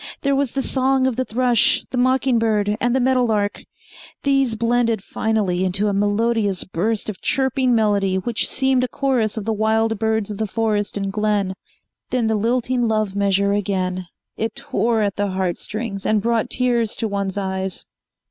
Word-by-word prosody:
There 280 0 +1
was 275 -3 0
the 270 - -1
song 265 0 +2
of 260 -3 0
the 255 - 0
thrush, 245 -1 +2
the 255 - -3
mocking 255 -1 +2
bird 210 -2 +1
and 245 +1 +2
the - - +3
meadow 255 0 +2
lark. 210 -3 0 0.6
These 275 -4 +2
blended 230 -2 +1
finally 210 -6 -1
into 195 +3 +1
a - - -1
melodious 205 0 +1
burst 205 +5 -2
of 215 -3 -6
chirping 265 -2 +1
melody 205 -3 +2
which 225 +5 0
seemed 265 -1 +2
a - - +1
chorus 250 -6 0
of 210 - -4
the 225 - 0
wild 220 0 +1
birds 220 -1 0
of 205 - -6
the 220 - -1
forest 210 -1 -1
and 195 -1 -3
glen. 210 -2 0 0.6
Then 250 -3 0
the 220 0 +1
lilting 240 +2 0
love 215 -3 0
measure 200 0 +2
again. 185 -3 -2 0.3
It 225 +1 -2
tore 230 -1 0
at 200 -2 -2
the 205 0 0
heart 185 -2 -2
strings, 210 -3 -5
and 215 -1 +2
brought 230 +1 0
tears 240 -3 +1
to 225 - -2
one's 200 -1 -3
eyes. 190 -1 -3
220 Hz, 180 wpm, -21 LUFS, 200-245 Hz, 0.6 s, the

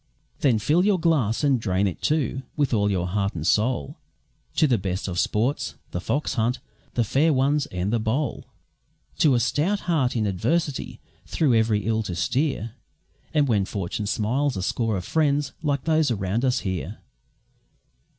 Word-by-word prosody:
Then 130 -6 +3
fill 155 - +2
your 200 -2 +3
glass, 150 -9 +1
and 135 -4 +3
drain 95 -2 0
it, 95 - -3
too, 140 -4 0 0.2
with 145 -4 +1
all 105 -2 +2
your 90 -3 0
heart 100 +1 -1
and 80 -2 -4
soul, 105 - +1 0.6
To - - +4
the 125 -7 +2
best 95 0 -3
of 90 -2 -2
sports 120 +7 0 0.2
The 90 - -3
Fox 145 +9 -1
hunt, 120 0 0 0.4
The 120 - +3
Fair 145 +9 +2
Ones, 140 +1 +2
and 90 +4 -2
The 115 - +2
Bowl, 120 +5 -2 0.7
To 145 -5 +5
a - - +3
stout 155 - 0
heart 150 -9 0
in 110 -2 +1
adversity 130 - -1 0.3
through 145 -6 +2
every 110 -3 +2
ill 110 0 +1
to 95 -5 -4
steer, 130 - -1 0.6
And 150 -3 +2
when 105 -5 +2
Fortune 100 +1 -4
smiles 125 +5 0
a 95 - -3
score 110 0 0
of 90 - -5
friends 145 - +1
like 140 -3 -1
those 160 -2 +2
around 105 +1 -1
us 130 0 +1
here. 95 -1 -4
120 Hz, 170 wpm, -24 LUFS, 100-145 Hz, 0.7 s, To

